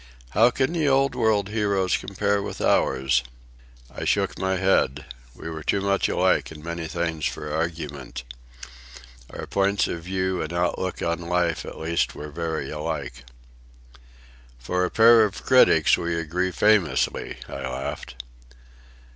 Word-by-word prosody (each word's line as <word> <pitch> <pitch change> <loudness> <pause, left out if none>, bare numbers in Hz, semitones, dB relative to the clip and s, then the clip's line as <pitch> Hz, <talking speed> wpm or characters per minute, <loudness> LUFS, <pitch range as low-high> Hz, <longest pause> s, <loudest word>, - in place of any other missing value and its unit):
"How 115 - +5
can 130 +5 0
the 160 -4 +1
Old 135 0 +3
World 110 -5 +1
heroes 100 -4 +1
compare 100 +1 -1
with - - -6
ours?" 65 -1 +2 0.7
I - - -5
shook - - 0
my 95 0 0
head. 90 -7 +1 0.3
We - - -9
were 80 -1 -5
too 100 - 0
much 100 0 +1
alike - - +1
in 75 -1 -11
many 85 0 -4
things 80 -1 -2
for 75 -1 -5
argument. 75 -7 -4 1.1
Our - - -7
points 100 0 +1
of 85 - -4
view 95 +1 -2
and 80 - -4
outlook 90 +1 -1
on 85 0 -1
life 85 -1 -1
at - - -8
least 85 +1 -1
were 75 0 -7
very 80 0 -3
alike. 65 -5 -5 1.3
"For 90 +9 -1
a - - -2
pair 115 0 +6
of 105 -2 -3
critics 125 - +5
we 85 -1 -2
agree 90 +4 -1
famously," 90 -6 +1
I - - -7
laughed. 65 -1 -5
85 Hz, 145 wpm, -24 LUFS, 80-100 Hz, 1.3 s, pair